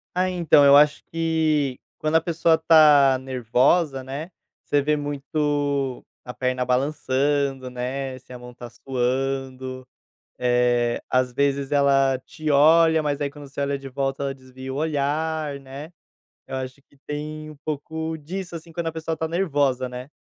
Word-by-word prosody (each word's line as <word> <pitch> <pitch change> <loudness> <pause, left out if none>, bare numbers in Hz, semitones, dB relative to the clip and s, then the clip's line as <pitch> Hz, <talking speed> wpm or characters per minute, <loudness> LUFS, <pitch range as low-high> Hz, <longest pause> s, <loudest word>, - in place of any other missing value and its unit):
Ah, 185 +1 +2
então, 170 -5 +4
eu 140 - +8
acho 145 0 +4
que 160 -5 0 0.2
quando 155 +1 +1
a - - +5
pessoa 165 -1 +2
tá 150 -4 +6
nervosa, 130 +4 +1
né, 140 +5 -6 0.4
você 145 -1 +1
vê 150 +2 +1
muito 145 -2 -2 0.2
a 125 - -8
perna 130 0 -1
balançando, 135 0 0
né, 130 +1 -4
se 130 0 -16
a 125 - -8
mão 125 0 -11
está 120 0 -10
suando, 130 +1 -3 0.5
eh, 120 -1 +1
às 130 0 +2
vezes 140 0 0
ela 135 -2 +3
te 155 -1 -5
olha 160 +2 +5
mas 145 -1 -2
aí 145 -1 -1
quando 145 0 -11
você 135 - -7
olha 140 0 -1
de 135 - -11
volta 135 +1 -2
ela 135 0 -2
desvia 130 0 -10
o - - -5
olhar, 150 0 -1
né, 140 +4 -10 0.6
eu 135 - -5
acho 130 +1 -6
que 140 - -26
tem 155 +1 -6
um - - -13
pouco 160 +2 -4
disso, 175 +4 -6
assim, 165 0 -9
quando 170 0 -3
a - - -1
pessoa 160 0 -4
está 160 0 -2
nervosa, 145 -7 0
né. 125 +2 -8
140 Hz, 165 wpm, -23 LUFS, 130-155 Hz, 0.6 s, eu